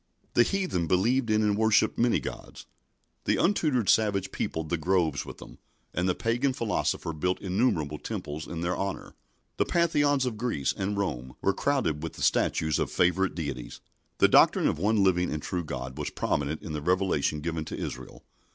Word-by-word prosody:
The - - +5
heathen 175 - 0
believed 115 +8 +2
in 110 0 +3
and 105 -1 +2
worshipped 110 0 +3
many 120 0 +3
gods. - - -8 0.6
The - - +2
untutored 155 - +1
savage 100 -4 +2
peopled 80 -1 -3
the 85 - 0
groves 80 -3 0
with - - -8
them, - - -13 0.3
and 90 +2 0
the 90 - +1
pagan 120 +4 0
philosopher 105 -7 -1
built 90 +4 -1
innumerable 90 - 0
temples 75 +2 -5
in 85 -1 -5
their 85 +1 0
honour. 100 -1 -4 0.4
The - - +2
Pantheons 145 -5 +2
of 120 -4 -3
Greece 110 - 0
and 100 +1 -2
Rome 65 -11 -3
were 100 - +3
crowded 130 - 0
with 80 - -5
the - - -6
statues 80 -1 +2
of - - 0
favourite 95 +2 +1
deities. 70 -7 -5 0.4
The - - +6
doctrine - - +5
of - - -1
one 105 +2 +2
living 90 -2 +2
and 75 - -2
true 90 +3 -3
God 65 -2 -6
was 75 - -2
prominent 75 +2 -2
in 80 - -6
the 75 - -3
revelation 90 -3 +1
given 80 0 -2
to - - -6
Israel. 65 0 -7
90 Hz, 180 wpm, -28 LUFS, 80-110 Hz, 0.6 s, The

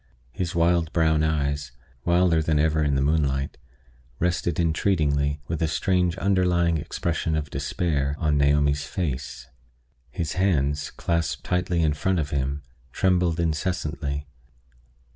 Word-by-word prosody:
His 90 +1 -3
wild 85 -1 +2
brown 80 -2 +3
eyes 70 -3 -1 0.3
wilder 85 -2 +3
than 80 -1 +1
ever 80 +1 +2
in 70 -1 +1
the 70 - +1
moonlight 70 -3 0 0.6
rested 85 +2 0
entreatingly, 75 -4 +1
with 85 - -3
a 80 - +2
strange 90 +2 +1
underlying 90 -4 +2
expression 80 +1 -2
of 75 -2 -3
despair, 70 -5 -1
on 75 -3 +1
Naomi's 70 0 +2
face. 65 -7 -4 0.6
His 80 -2 -3
hands, 75 -6 +1
clasped 85 -3 -2
lightly 90 -2 +1
in 75 -1 +2
front 95 +6 0
of 75 -3 -2
him, 70 +1 -2 0.3
trembled 90 -1 +1
incessantly. 75 -3 -2
80 Hz, 125 wpm, -25 LUFS, 70-85 Hz, 0.6 s, brown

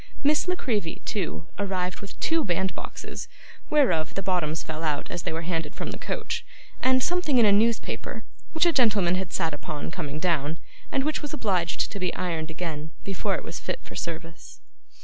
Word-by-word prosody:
Miss 295 +4 +4
La 360 - +3
Creevy, 210 - -1
too, 80 +1 -2
arrived 185 -2 -1
with 200 - -9
two 325 -1 +3
bandboxes 185 -3 -2 0.4
(whereof 180 - +3
the 195 - -1
bottoms 170 -4 +1
fell 155 0 -4
out 150 -3 -1
as 175 - -2
they - - -2
were 165 +1 -2
handed 165 -3 -2
from - - -3
the - - -6
coach) - - -2 0.4
and 260 0 +4
something 350 -6 +3
in 235 - +7
a 205 - +7
newspaper, 225 +3 +2 0.3
which 320 +2 +4
a 340 - +5
gentleman 210 - +4
had 185 -1 -1
sat 165 -4 +1
upon, 145 +1 -4
coming 155 -5 -3
down, 160 -2 +1 0.3
and 265 - +2
which 305 +2 0
was 295 0 -3
obliged 185 - +1
to 200 - -4
be 180 -2 +1
ironed 165 -3 -1
again, 155 -2 -4
before 195 -1 0
it - - -4
was - - -5
fit - - -2
for - - -10
service. 165 0 -6
180 Hz, 190 wpm, -27 LUFS, 160-235 Hz, 0.4 s, in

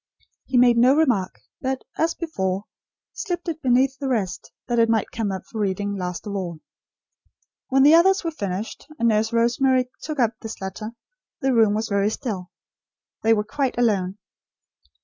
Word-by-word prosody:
He 260 - 0
made 240 -1 +5
no 255 +3 +6
remark; 245 -12 +1 0.2
but, 265 0 -2
as 330 +1 0
before, 195 - -2 0.5
slipped 360 -5 -4
it 320 -1 -3
beneath 265 +2 +2
the 275 - -3
rest, 215 -8 -2 0.2
that 240 -2 +1
it 230 0 +4
might 225 -2 +1
come 220 -3 -2
up 190 - -5
for 225 - -7
reading, 200 0 -1
last 180 -2 -4
of 205 - -4
all. 175 -5 -4 1.1
When 270 0 +4
the 295 +3 +7
others 380 +4 +5
were 330 - -1
finished, 200 - -5
and 235 -3 +3
Nurse 220 0 +1
Rosemary 250 +2 +2
took 305 -2 -5
up 235 -3 +3
this 225 -1 -7
letter, 195 +4 -6 0.5
the 265 -1 +2
room 220 -3 +4
was 220 +1 -1
very 200 0 +1
still. 215 -6 -4 0.7
They 225 - +3
were 210 - 0
quite 270 +3 -2
alone. 200 -5 +1
230 Hz, 170 wpm, -23 LUFS, 200-270 Hz, 1.1 s, the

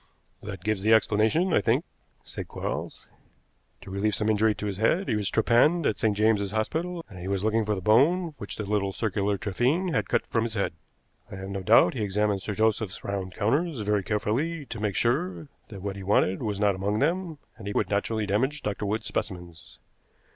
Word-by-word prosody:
"That 100 -3 -7
gives 110 -1 0
the 110 +3 +4
explanation, 110 - +2
I - - +4
think," 125 +8 +1 0.4
said - - -7
Quarles. - - -5 0.8
"To - - -10
relieve 100 +1 0
some 105 +2 0
injury 110 0 +3
to - - -5
his 100 -2 -3
head, 160 - +2
he 110 - +1
was 105 -2 0
trepanned 130 +9 +3
at 105 - 0
St. 105 -2 +1
James's 105 -2 +2
Hospital, 165 - -2
and 95 -4 -11
he 90 - -6
was 100 0 -1
looking 110 +1 +2
for 105 0 0
the 95 - -5
bone 155 - +3
which 100 - -5
the 105 - -4
little 100 -1 0
circular 100 -2 -1
trephine 125 - 0
had - - 0
cut 120 - +1
from 115 - 0
his 115 -1 -4
head. 100 - -1 0.6
I - - -6
have 95 0 -7
no 100 0 -4
doubt 110 +5 +5
he 120 - -4
examined 105 0 0
Sir 105 +1 -4
Joseph's 110 -2 0
round 95 -2 -4
counters 135 +6 0
very 105 0 +1
carefully 120 - -1
to 115 - -7
make 105 -3 -1
sure 90 - 0 0.2
that 95 -2 -10
what 100 -1 -3
he 100 - -7
wanted 95 -1 +2
was 105 -4 -2
not 105 -1 +3
among 100 +3 -1
them, 165 +4 0 0.2
and 100 - -9
he 100 - -2
would 100 -2 0
naturally 105 +2 0
damage 130 +9 0
Dr. 105 0 -2
Wood's 110 +2 -2
specimens. 90 -4 -5
105 Hz, 205 wpm, -27 LUFS, 100-115 Hz, 0.8 s, doubt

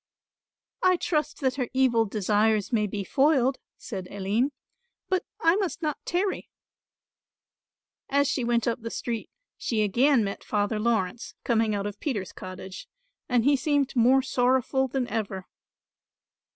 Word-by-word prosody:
"I 370 0 +5
trust 305 -3 -1
that 260 -1 0
her 250 -3 -1
evil 245 -4 +3
desires 210 +1 +1
may 210 -2 +2
be 200 0 -4
foiled," 270 +2 +2 0.2
said 190 -5 -6
Aline, 205 +7 0 0.6
"but 375 -1 +1 0.2
I 330 +2 +4
must 375 -4 -2
not 300 -2 -2
tarry." 375 +3 -1 1.6
As 280 +1 +3
she 260 - -1
went 235 0 +1
up 235 0 -1
the 230 - -5
street 230 -1 -4 0.3
she 220 -3 0
again 240 +4 +3
met 200 -1 -4
Father 210 +1 0
Laurence 225 -1 -1
coming 225 -3 +1
out 200 0 -2
of 205 0 -5
Peter's 210 - -3
cottage 185 0 -8 0.4
and 245 -2 +2
he 285 0 +5
seemed 280 0 0
more 255 +3 +5
sorrowful 260 +1 +1
than 260 -1 -2
ever. 200 -4 -3
240 Hz, 140 wpm, -26 LUFS, 210-275 Hz, 1.6 s, I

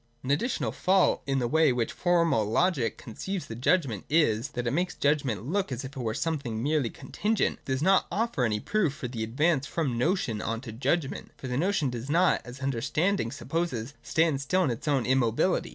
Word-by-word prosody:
An 130 - -2
additional 145 - 0
fault 185 - +2
in 135 0 +1
the 125 -2 +1
way 160 +4 +4
in 125 - +1
which 115 -2 0
Formal 170 -9 +2
Logic 115 - +1
conceives 185 - -5
the - - -7
judgment 125 - +1
is, 140 -7 +3
that 125 -1 -3
it 120 - 0
makes 180 +4 0
the - - -29
judgment 140 -8 +1
look 185 +2 -1
as 125 +1 -4
if 130 - -7
it 130 - -4
were 110 -2 -2
something 135 -9 -2
merely 145 -4 +1
contingent, 200 - -1
and - - -35
does 130 +2 -1
not 190 +1 +4
offer 225 - 0
any 105 -3 +1
proof 180 - 0
for 125 - -5
the 115 -2 -4
advance 140 +5 +1
from 135 -8 -1
notion 125 - 0
on 115 0 -2
to 125 -4 -8
judgment. 135 +6 -1
For 130 - -7
the 125 - -2
notion 160 -2 +1
does 120 +2 -6
not, 175 +4 +3
as 125 +2 -10
understanding 150 - 0
supposes, 145 -7 -3
stand 160 -4 +1
still 185 +7 +1
in 135 - +1
its 120 +5 -6
own 140 -4 +2
immo 130 -3 +3
bility. 180 +10 +1
135 Hz, 215 wpm, -28 LUFS, 120-170 Hz, -, way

